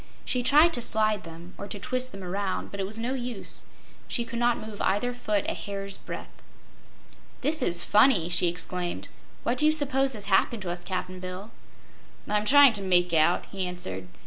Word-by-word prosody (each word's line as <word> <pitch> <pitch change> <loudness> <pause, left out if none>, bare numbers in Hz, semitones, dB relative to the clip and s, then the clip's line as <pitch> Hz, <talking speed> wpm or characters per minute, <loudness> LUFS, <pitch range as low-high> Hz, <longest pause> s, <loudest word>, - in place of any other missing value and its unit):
She 250 - +1
tried 300 +7 +5
to 240 - +3
slide 215 -4 +1
them, 165 +2 -11
or 200 - -5
to 205 - -6
twist 255 +5 -3
them 195 -1 -9
around, 190 +1 -3
but 200 - -7
it 190 - -1
was 215 +2 -5
no 235 +3 -2
use; 245 -5 -4 0.4
she 235 - -1
could 235 0 -5
not 240 0 +3
move 215 -1 -7
either 245 +5 +1
foot 210 -4 -1
a - - 0
hair's 195 -1 -5
breadth. - - -8 1.1
"This 300 +3 0
is 175 -7 +2
funny!" 210 -6 +4
she 175 0 +2
exclaimed. 180 0 -3 0.3
"What 245 +1 0
do 300 - +5
you - - +6
'spose 275 -3 +1
has 210 -3 -5
happened 200 +2 +2
to 175 - -3
us, 175 0 -6
Cap'n 185 0 -4
Bill?" 185 +4 -7 0.8
"I'm 210 0 0
tryin' 280 0 +7
to 205 - -2
make 180 -2 +2
out," 160 +2 +3
he 190 -2 -2
answered. 95 - -5
205 Hz, 195 wpm, -27 LUFS, 180-245 Hz, 1.1 s, tryin